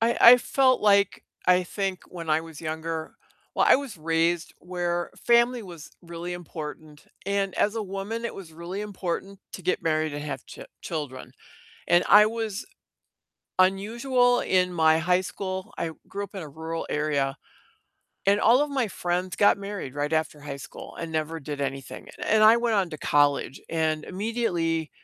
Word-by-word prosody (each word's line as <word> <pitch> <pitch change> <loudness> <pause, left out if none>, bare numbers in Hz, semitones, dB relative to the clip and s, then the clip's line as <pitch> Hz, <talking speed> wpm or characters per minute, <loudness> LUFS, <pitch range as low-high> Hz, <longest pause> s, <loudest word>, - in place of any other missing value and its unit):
I 230 +1 +2
I 240 +2 +11
felt 260 +1 +3
like, 200 -2 +3 0.2
I 180 0 +5
think 190 0 -3
when 165 -3 -6
I 155 +1 +3
was 160 -2 -10
younger 160 0 -4 0.4
Well, - - +3
I - - +8
was 270 -6 -6
raised 165 +2 0
where 175 -1 -2 0.2
family 235 0 +4
was 170 -5 -10
really 170 +1 -6
important, 155 -3 -8 0.2
and 200 -1 0
as 210 - +2
a 225 - -1
woman, 200 +4 -5
it 235 - -3
was 180 -5 -10
really 170 +4 -6
important 195 -1 -4
to 185 - -7
get 180 - 0
married 155 -2 0
and 145 0 -5
have 150 - -5
ch - - -11 0.2
children. 150 -6 -5 0.6
And 175 +1 +5
I 210 +1 +8
was 220 -2 -3 0.9
unusual 240 +7 +3
in 180 -1 +2
my 160 -2 +4
high 180 +3 +2
school, 190 0 -5
I 165 - -1 0.2
grew 200 +1 -4
up 200 - -13
in 190 - -4
a 155 - -8
rural 160 +3 -5
area, 145 -2 0 0.9
and 200 +1 +4
all 245 +5 +5
of 295 - -2
my 260 -5 0
friends 180 -1 -2
got 205 - +5
married 200 -9 -6
right 145 +1 -2
after 155 -1 -1
high 145 -1 -6
school - - -11
and 165 -1 -5
never 160 +1 -2
did 145 0 -6
anything, 135 -1 -5 0.2
and 220 0 +3
I 220 +2 +8
went 235 -2 +1
on 190 -3 +1
to 155 - -7
college, 145 -2 +2
and 160 -1 0
immediately 180 -7 -1
180 Hz, 175 wpm, -26 LUFS, 160-205 Hz, 0.9 s, I